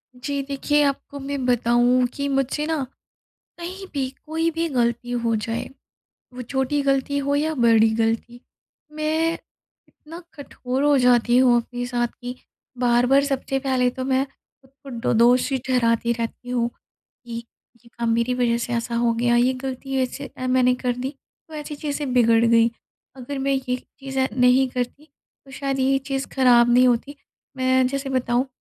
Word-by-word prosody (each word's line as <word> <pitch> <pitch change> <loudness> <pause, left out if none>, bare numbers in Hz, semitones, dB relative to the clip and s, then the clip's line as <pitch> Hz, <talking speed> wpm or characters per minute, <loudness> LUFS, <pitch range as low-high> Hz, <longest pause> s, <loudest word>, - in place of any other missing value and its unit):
जी 280 +3 -3
देखिए, 285 +2 0
आपको 280 0 -2
मैं 275 -1 -4
बताऊँ 245 +1 +3
कि 280 0 -3
मुझसे 275 +2 0
ना 315 -4 -1 0.8
कहीं 370 +3 -7
भी 265 -2 -1 0.2
कोई 325 +1 0
भी 330 +1 -1
गलती 240 -2 -1
हो 235 -2 0
जाए 225 +2 -3 0.6
वो 250 - -7
छोटी 265 +3 -1
गलती 275 +1 0
हो 280 0 0
या 310 +2 0
बड़ी 225 -2 +4
गलती, 230 +2 -1 0.5
मैं 315 +2 0 0.5
इतना 325 +3 -12
कठोर 270 -2 -4
हो 290 -1 +4
जाती 245 -1 +4
हूँ 250 -2 +5
अपने 245 +1 -6
साथ 240 -1 -1
कि 245 +1 -5 0.4
बार-बार 245 +3 +3
सबसे 270 -1 -2
पहले 260 -2 +1
तो 255 +1 -6
मैं 265 0 +1
ख़ुद 270 0 -29
को 275 - -10 0.2
ड - - +2
दोषी 250 +3 +4
ठहराती 235 -2 +2
रहती 235 +1 -5
हूँ 240 -1 0
कि 235 0 -12 0.4
ये - - -19
काम 235 -1 -1
मेरी 235 +2 +1
वज़ह 240 -2 +1
से 240 +1 -3
ऐसा 235 0 -2
हो 235 0 +2
गया, 240 +1 +1
ये 245 +2 +3
गलती 265 +1 -5
ऐसे 275 +2 -5
अ, 255 - -3
मैंने 255 0 +3
कर 250 -1 -1
दी 255 +2 -3 0.4
तो 320 - -14
ऐसी 295 0 -6
चीज़ें 285 -2 -3
बिगड़ 230 -2 +4
गईं। 230 0 +4 0.5
अगर 270 +2 -6
मैं 275 +1 0
ये 260 -2 -1 0.2
चीज़ें 265 -1 -1
नहीं 250 +1 +4
करती 250 +4 -4 0.4
तो 270 - -15
शायद 275 -1 -3
ये 270 +1 +3
चीज़ 270 -1 -2
ख़राब 245 -3 +5
नहीं 250 +1 +6
होती। 250 +4 0 0.4
मैं 260 0 +3
जैसे 275 +1 -3
बताऊँ 255 0 0
255 Hz, 170 wpm, -23 LUFS, 240-275 Hz, 0.8 s, नहीं